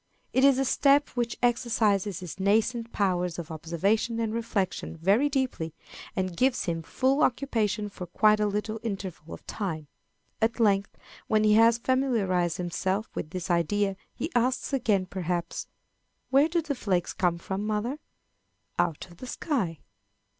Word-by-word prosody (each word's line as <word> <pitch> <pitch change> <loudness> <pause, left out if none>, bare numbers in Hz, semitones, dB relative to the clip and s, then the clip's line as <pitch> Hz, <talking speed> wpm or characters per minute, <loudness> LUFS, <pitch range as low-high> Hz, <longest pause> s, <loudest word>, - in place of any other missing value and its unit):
It 260 - +3
is 275 -2 +6
a 270 - +1
step 280 +2 +4
which 240 -1 -2
exercises 220 -6 +1
his 180 +1 -7
nascent 225 +4 +1
powers 180 -4 0
of 170 -1 -6
observation 195 +9 0
and 225 -1 -1
reflection 205 -7 -2
very 200 - +3
deeply, 255 - -2 0.4
and 185 -2 -1
gives 255 +5 +2
him 165 -1 -1
full 265 - +1
occupation 220 -6 +1
for 190 -3 -8
quite 215 +4 +4
a 210 - +2
little 210 +2 -2
interval 195 -7 -5
of - - -18
time. 165 -7 -4 0.6
At 225 +1 +1
length, 200 -3 +2 0.3
when 215 -1 +3
he 210 0 +5
has 230 +1 +6
familiarized 220 -10 +1
himself 190 +4 -2
with 155 - -4
this 180 +1 -4
idea, 195 +4 +1 0.2
he 330 - -4
asks 250 +3 +1
again, 215 -8 +2
perhaps, 180 -2 -3 0.6
"Where 280 +4 +5
do 335 0 +1
the 290 - -2
flakes 185 -9 -1
come 175 -3 +1
from, 190 +4 -4
mother?" 220 +7 -1 0.8
"Out 155 - 0
of 170 -2 -17
the 255 - -8
sky." 215 - -2
210 Hz, 155 wpm, -27 LUFS, 180-240 Hz, 0.8 s, is